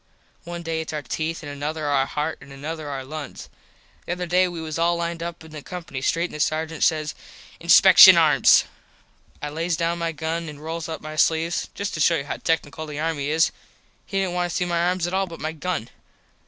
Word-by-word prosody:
One 170 0 -6
day 165 -1 -2
its 160 - -6
our 150 -1 -3
teeth 165 +2 -3
an 145 - -7
another 150 +2 -4
our 140 -2 +2
heart 150 +2 -3
an 140 - -14
another 150 +2 -6
our 135 -2 -4
lungs. 150 +1 -8 0.6
The 175 - -1
other 180 0 -4
day 180 +2 +3
we 175 -2 -6
was 160 0 -5
all 170 +1 +3
lined 170 0 -3
up 170 -1 -6
in 160 - -13
the 150 -1 -8
company 165 -6 -7
street 165 +5 +1
and - - -8
the 150 - -7
Sargent 160 +2 -1
says 155 -2 +1 0.5
"Inspecshun - - +9
arms." - - +6 0.8
I 150 - -2
lays 165 +2 -2
down 170 0 -1
my 165 0 -1
gun 165 +1 -3
an 150 - -9
rolls 160 +1 -5
up 160 - -5
my 155 0 -7
sleves. 165 +1 +1
Just 200 0 -3
to - - -4
show 165 +2 +4
you 140 - -2
how - - -4
tecknickle 155 -1 -2
the 150 -1 -6
army 155 -3 -1
is 160 +2 +3 0.6
he 195 - -3
didnt 190 -2 0
want 180 0 -1
to - - -5
see 180 - 0
my 170 -1 0
arms 180 -1 0
at 175 - -4
all 190 0 +1
but 165 -2 -10
my 155 - -3
gun. 160 -6 -3
160 Hz, 225 wpm, -23 LUFS, 150-170 Hz, 0.8 s, Inspecshun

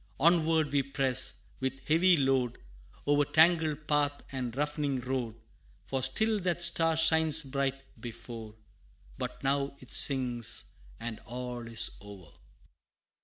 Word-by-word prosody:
Onward 160 -1 +3
we 140 -1 +2
press, 135 -1 -1 0.2
with 130 0 -4
heavy 175 +3 +4
load, 130 -3 +1 0.5
O'er 145 0 +3
tangled 160 -1 +2
path 145 -1 0
and 130 -3 -4
rough'ning 145 -1 -1
road, 125 -3 -3 0.5
For 135 -1 -2
still 215 +12 +1
that 175 -2 0
Star 165 -1 +4
shines 160 -1 +5
bright 135 0 -2 0.2
before; 115 -2 -9 0.6
But - - -6
now 140 +1 0
it 130 - -11
sinks, 125 -4 +2 0.3
and 115 -2 -6
all 125 0 -6
is 115 -1 -1
o'er! 100 -6 -13
135 Hz, 120 wpm, -30 LUFS, 125-155 Hz, 0.6 s, shines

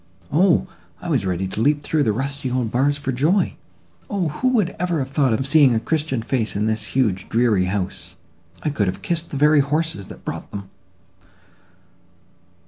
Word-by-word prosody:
O! 175 +3 +4 0.3
I 175 - -6
was 130 - +1
ready 95 +1 -1
to 105 - -4
leap 145 +3 +2
through 155 +1 0
the 115 - +2
rusty 135 +4 -3
old 125 -3 -1
bars 140 +3 +2
for 140 -2 -3
joy!—O! 175 +4 -2
who 150 - -1
would 215 -8 +1
ever 175 -1 0
have 135 -3 -2
thought 140 -2 +2
of 115 +4 0
seeing 140 -4 +5
a - - +2
christian 140 -1 -1
face 115 -3 -1
in 105 +1 0
this 110 +2 -2
huge 100 -8 +1
dreary 115 -5 +2
house? 95 0 -3 0.5
I 150 - 0
could 105 -8 0
have 95 - -3
kissed 170 -1 -1
the 140 - -4
very 150 +1 +5
horses 150 - -1
that - - -12
brought - - -5
them." 100 -1 -8
135 Hz, 180 wpm, -22 LUFS, 110-155 Hz, 0.5 s, seeing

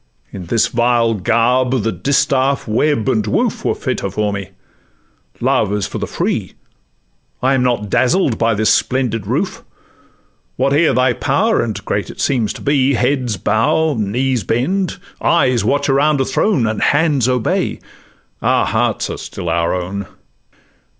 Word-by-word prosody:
In 90 -3 -7
this 115 +4 +2
vile 120 -1 +1
garb, 120 +4 +1
the 115 - 0
distaff, 135 0 +1
web, 120 +3 +1
and 110 -5 +1
woof, 105 - 0
Were - - 0
fitter - - -3
for 105 -1 -1
me: 100 -2 -5 0.9
Love - - +1
is 105 -2 -1
for 105 - -5
the - - -3
free! - - -2 0.9
I 130 +1 +3
am 135 - +2
not 120 -4 0
dazzled 130 -2 +2
by 115 -1 +2
this 110 +1 +2
splendid 120 -6 -1
roof, 145 - -2 0.9
Whate'er 140 +5 +2
thy 130 0 +2
power, - - +1
and - - -4
great - - -2
it - - -11
seems 120 -6 0
to - - -10
be; 140 -1 +2
Heads 125 -3 0
bow, 115 +11 +1
knees 120 +2 -1
bend, 175 - -1 0.2
eyes 130 -9 +2
watch 140 +6 +1
around 145 +1 +2
a 135 - +1
throne, 135 - +1
And 110 -1 -2
hands 145 -5 +2
obey—our 125 -3 -2
hearts - - 0
are - - -6
still 85 - -6
our 85 +1 0
own. 95 +2 -5
125 Hz, 150 wpm, -17 LUFS, 110-135 Hz, 0.9 s, I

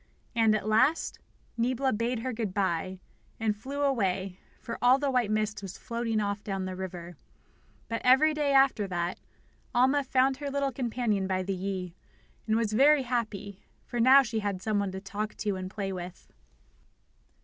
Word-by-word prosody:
And, 225 -2 +4
at 210 -1 -3
last, 255 +9 +2 0.4
Niebla 255 +3 +1
bade 230 +2 -1
her 255 +1 -3
good 220 -4 -3
bye, 185 -1 -1 0.4
and 220 -2 0
flew 275 +7 -4
away, 195 -8 0 0.2
for 230 - -6
all 250 +2 +6
the 280 0 -1
white 245 -4 +1
mist 215 0 -1
was 190 -2 -7
floating 230 -2 -2
off 200 0 -2
down 195 -2 -3
the 185 0 -4
river. 175 -3 -7 0.7
But 230 0 -3
every 265 +5 +5
day 295 -2 0
after 270 -6 +4
that, 175 -1 -2 0.6
Alma 265 +4 +4
found 265 0 +2
her 285 0 -4
little 280 0 0
companion 235 -6 -1
by 185 -1 0
the 195 +1 -2
Yi, 185 -2 -4 0.5
and 220 - +2
was 225 -2 0
very 280 +4 +5
happy, 215 -5 -3 0.2
for 240 - -4
now 265 +4 +7
she 230 -3 -2
had 205 -3 -2
some 210 +2 0
one 200 -1 -1
to 190 - -4
talk 210 +2 -5
to 205 -2 -2
and 185 0 -5
to - - -20
play 195 -2 -2
with. 180 -1 -9
215 Hz, 180 wpm, -29 LUFS, 195-255 Hz, 0.7 s, now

